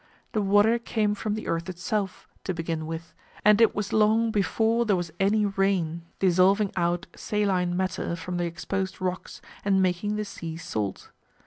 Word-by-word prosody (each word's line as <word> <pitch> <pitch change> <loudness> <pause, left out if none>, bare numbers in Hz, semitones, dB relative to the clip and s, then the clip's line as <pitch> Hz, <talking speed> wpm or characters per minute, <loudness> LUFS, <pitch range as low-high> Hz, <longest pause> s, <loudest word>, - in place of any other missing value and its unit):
The 215 - 0
water 205 +4 +4
came 215 -3 0
from 210 +1 -2
the 215 - -5
earth 165 +2 -2
itself, 190 +2 -3 0.2
to 185 - -2
begin 165 -1 -3
with, 165 0 -6 0.3
and 210 +1 +6
it 230 - +5
was 205 -1 -3
long 220 +1 +3
before 220 +4 +2
there 210 -4 +2
was 175 -2 -3
any 205 +2 +3
rain 190 -4 0
dissolving 190 +2 +3
out 175 +1 0
saline 185 -4 0
matter 185 -2 -1
from 175 +2 -5
the 175 - 0
exposed 190 +3 -3
rocks 185 -1 -4 0.2
and 195 -1 +3
making 190 +3 +1
the 210 0 -2
sea 165 -5 -6
salt. 105 - -4
190 Hz, 165 wpm, -26 LUFS, 175-210 Hz, 0.3 s, and